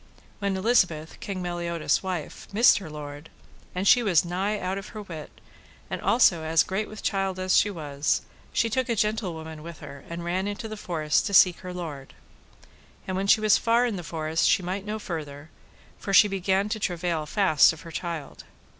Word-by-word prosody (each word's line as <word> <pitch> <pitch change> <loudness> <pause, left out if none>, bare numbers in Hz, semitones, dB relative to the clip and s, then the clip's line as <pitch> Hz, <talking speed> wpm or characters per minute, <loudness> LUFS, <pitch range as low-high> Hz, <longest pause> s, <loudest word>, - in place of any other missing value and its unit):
When 200 -2 -1
Elizabeth, 180 -7 +1
King 195 -4 -5
Meliodas' 170 -2 -1
wife, 185 -5 -5
missed 225 +3 +5
her 185 -6 -9
lord, 150 0 -8 0.5
and 185 +2 -1
she 245 - +7
was 180 -7 +3
nigh 190 +5 -1
out 190 0 -3
of 195 - -10
her 215 - -8
wit, 165 -6 -8 0.6
and - - -3
also 195 -8 +4
as 160 +1 +3
great 195 +3 -3
with 215 - -10
child 195 -2 -1
as 185 0 +1
she 205 - +4
was, 150 -6 -1 0.3
she 230 - +1
took 255 +3 -1
a 235 - +1
gentlewoman 180 -8 -2
with 170 0 -9
her, 140 0 -11
and 170 0 -6
ran 185 +3 -1
into 205 +2 -4
the 215 - -6
forest 160 -7 0
to 200 - 0
seek 180 -1 +7
her 185 - -7
lord. 155 -7 -7 0.9
And 185 - -2
when 195 +1 -1
she 215 - +5
was 215 -1 +4
far 235 +1 +3
in 235 -4 -1
the 180 - -5
forest 160 0 0
she 185 - +3
might 190 +3 -4
no 215 +1 -2
farther, 155 -6 -7 0.5
for 195 - -4
she 210 - +8
began 195 0 0
to 220 0 -2
travail 170 -4 -2
fast 185 -5 +4
of 160 - -10
her 165 - -10
child. 165 -3 -6
180 Hz, 195 wpm, -26 LUFS, 160-205 Hz, 0.9 s, she